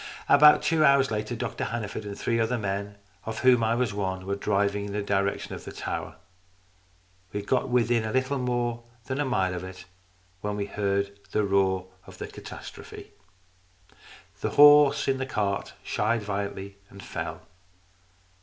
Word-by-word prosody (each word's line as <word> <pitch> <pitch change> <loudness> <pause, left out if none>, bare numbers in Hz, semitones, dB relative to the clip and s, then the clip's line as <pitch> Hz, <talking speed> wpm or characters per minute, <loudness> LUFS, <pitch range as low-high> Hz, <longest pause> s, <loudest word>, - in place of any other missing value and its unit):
About 150 +1 +7
two 160 -2 +2
hours 140 -2 +4
later 105 +2 -2
Dr 115 -2 -3
Hanneford 110 -2 -4
and 100 -1 -6
three 115 0 0
other 115 +2 +1
men, 100 -1 -3 0.3
of 110 0 -5
whom 125 -2 +5
I 110 +1 +2
was 120 -4 0
one, 95 -2 -3
were 100 +1 -1
driving 100 0 0
in 100 - -6
the 105 0 -2
direction 100 0 -1
of - - -8
the - - -8
tower. - - -5 1.2
We 105 - -3
had 100 - -15
got 130 +1 +1
within 120 -2 +2
a 110 - -3
little 130 +2 0
more 120 -1 -1 0.2
than 130 +1 -3
a 145 - +1
mile 95 -8 0
of 90 0 -5
it 95 0 -9 0.5
when 105 +1 -3
we 100 -1 -2
heard 100 0 -2
the 105 - +2
roar 95 -2 +1 0.2
of - - -12
the - - -5
catastrophe. - - -10 1.3
The - - -1
horse 145 -1 +7
in 135 -1 +1
the 130 - -2
cart 105 -5 -2
shied 110 +1 0
violently 100 -1 -4
and 100 - -12
fell. - - -5
105 Hz, 170 wpm, -27 LUFS, 100-125 Hz, 1.3 s, About